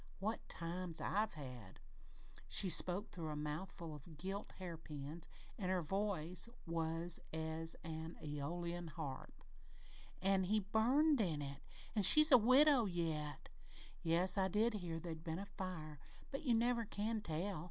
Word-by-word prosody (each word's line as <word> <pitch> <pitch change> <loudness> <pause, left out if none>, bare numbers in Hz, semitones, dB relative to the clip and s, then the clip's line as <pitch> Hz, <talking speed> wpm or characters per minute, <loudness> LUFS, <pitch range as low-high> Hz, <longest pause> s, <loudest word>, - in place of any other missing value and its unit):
What 215 +4 -4
times 170 0 -5
I've 210 -2 -1
had!" 125 -9 -9 0.7
She 190 - +4
spoke 185 +5 +2
through 165 -3 -5
a 150 - -4
mouthful 155 +2 -5
of 150 +2 -12
gilt 195 +5 -5
hairpins 160 -3 -7 0.3
and 185 -3 -2
her 185 -2 0
voice 190 +1 0 0.2
was 165 0 +1
as 160 +1 -2
an 160 0 -6
Æolian 170 +3 -5
harp. 150 -5 -8 0.8
"An' 190 0 +2
he 215 +4 +2
burned 250 +8 +2
in 160 -7 -1
it 140 0 -7 0.3
an' 210 - +2
she's 305 - +11
a 255 - +9
widow 255 +2 +6
yet! 160 -6 -3 0.5
Yes, 180 +4 +2
I 190 - +2
did 215 +5 +1
hear 175 -5 -4
there'd 160 -1 -7
been 165 -1 -4
a 200 - -5
fire, 180 -7 -7 0.3
but 275 - -4
you 250 -7 +2
never 235 +1 +1
can 215 +2 -3
tell. 175 +1 -3
175 Hz, 145 wpm, -38 LUFS, 160-205 Hz, 0.8 s, she's